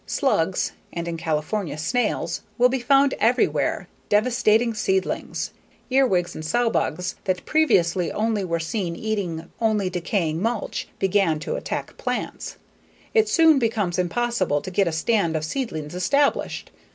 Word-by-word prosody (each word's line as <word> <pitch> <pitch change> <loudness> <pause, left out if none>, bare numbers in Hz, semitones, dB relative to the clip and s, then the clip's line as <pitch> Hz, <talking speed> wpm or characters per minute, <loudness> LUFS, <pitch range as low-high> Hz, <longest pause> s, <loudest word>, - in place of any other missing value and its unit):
Slugs 190 - +1 0.2
(and 170 0 -4
in 170 - -3
California, 160 +2 -2
snails) 245 +11 -1 0.2
will 250 0 +5
be 265 +1 -1
found 275 +2 +4
everywhere, 240 +4 +1 0.2
devastating 225 +1 +3
seedlings. 190 -3 -1 0.4
Earwigs 220 -10 +2
and 155 - -7
sow 230 +9 +1
bugs, 175 +2 -1
that 185 -1 -1
previously 180 - +2
only 215 -1 0
were 170 -2 -1
seen 170 +1 -2
eating 180 -7 -3
only 210 -5 +1
decaying 170 -2 -1
mulch, 230 0 -2
begin 195 -4 +2
to 155 - -3
attack - - -4
plants. - - -4 0.6
It 440 -1 +4
soon 320 -4 +5
becomes 210 -7 0
impossible 185 -4 0
to 185 - -7
get 195 0 +2
a - - 0
stand 165 0 +1
of 155 0 -1
seedlings 160 - -4
established. 280 +11 0
195 Hz, 140 wpm, -23 LUFS, 170-235 Hz, 0.6 s, will